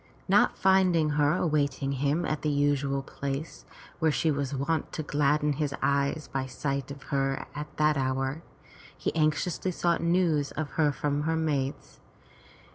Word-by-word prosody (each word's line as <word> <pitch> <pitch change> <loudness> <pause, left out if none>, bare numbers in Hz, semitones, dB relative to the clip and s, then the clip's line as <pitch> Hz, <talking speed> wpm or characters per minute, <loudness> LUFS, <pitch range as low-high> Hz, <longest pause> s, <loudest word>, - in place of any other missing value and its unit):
Not - - +4
finding 185 -5 +3
her 145 +1 +3
awaiting 145 -5 0
him 145 +5 0
at 155 - -2
the 155 - 0
usual 140 -1 +1
place, 140 +3 -5 0.3
where 160 -2 +3
she 155 +2 +1
was 140 -2 -2
wont 150 +3 -1
to 155 - -3
gladden 150 0 +1
his 140 -1 -2
eyes 140 +2 0
by 135 -1 -3
sight 140 +1 -3
of 140 0 -9
her 135 0 0
at 150 +1 -5
that 150 -1 +3
hour, 135 +3 -1 0.6
he - - -2
anxiously 155 +4 0
sought 170 -1 0
news 170 -4 +2
of 150 -2 -4
her 150 0 +2
from 145 +1 -1
her 160 - +1
maids. 145 -4 -2
145 Hz, 155 wpm, -28 LUFS, 140-155 Hz, 0.6 s, Not